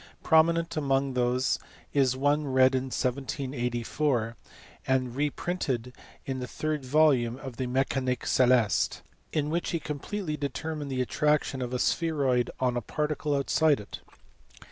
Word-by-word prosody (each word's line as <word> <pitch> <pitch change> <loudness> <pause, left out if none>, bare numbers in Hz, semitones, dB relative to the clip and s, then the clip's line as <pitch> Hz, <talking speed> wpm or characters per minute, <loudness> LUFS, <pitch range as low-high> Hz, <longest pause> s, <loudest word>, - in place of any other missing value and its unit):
Prominent 165 +1 +3
among 135 -2 +1
these 125 +1 +1 0.3
is 130 -3 +2
one 145 +2 +2
read 130 0 +4
in 130 0 0
1784, 125 -1 -1 0.5
and 130 -2 +1
reprinted 140 -4 -2 0.3
in 135 -1 -3
the 125 - -4
third 155 +2 -3
volume 130 -4 +3
of 130 -3 -8
the 130 - -2
Mecanique 130 0 0
celeste, 125 -4 +3 0.3
in 150 -1 -1
which 170 +1 -1
he 170 - -1
completely 155 +3 -4
determined 145 +1 -4
the 130 -1 0
attraction 150 0 +1
of 125 -1 -3
a 125 - -1
spheroid 135 -4 +1
on 125 -1 +1
a 120 - 0
particle 150 +4 -1
outside 145 +2 +3
it. 105 - -9
135 Hz, 135 wpm, -28 LUFS, 125-150 Hz, 0.5 s, read